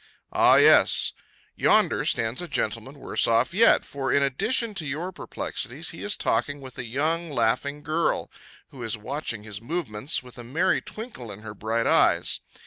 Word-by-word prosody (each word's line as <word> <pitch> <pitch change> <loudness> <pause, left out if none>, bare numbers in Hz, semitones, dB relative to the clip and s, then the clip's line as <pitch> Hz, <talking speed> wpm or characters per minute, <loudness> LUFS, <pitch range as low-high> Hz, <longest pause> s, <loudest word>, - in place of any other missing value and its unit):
Ah, - - +6
yes! - - +5 0.4
Yonder - - +3
stands 115 +5 0
a 175 - -5
gentleman 125 0 -3
worse - - +1
off 115 +7 +2
yet, 225 +5 +5
for, 135 -2 -3
in 140 - +3
addition 220 - 0
to 185 -6 -4
your 160 +7 -3
perplexities, 175 - -4
he - - -9
is - - +1
talking 145 0 0
with 130 -2 -11
a 125 - -4
young, 160 +8 -1
laughing 140 +3 0
girl, 160 +2 0 0.4
who 130 - -12
is 115 -1 -2
watching 120 -1 -5
his 105 -1 -7
movements, 130 -2 -2
with 125 0 -13
a - - -7
merry 155 +10 +1
twinkle 215 - -8
in 100 +1 -10
her 110 -1 -8
bright 110 +2 -1
eyes. - - +3
135 Hz, 170 wpm, -25 LUFS, 115-160 Hz, 0.4 s, Ah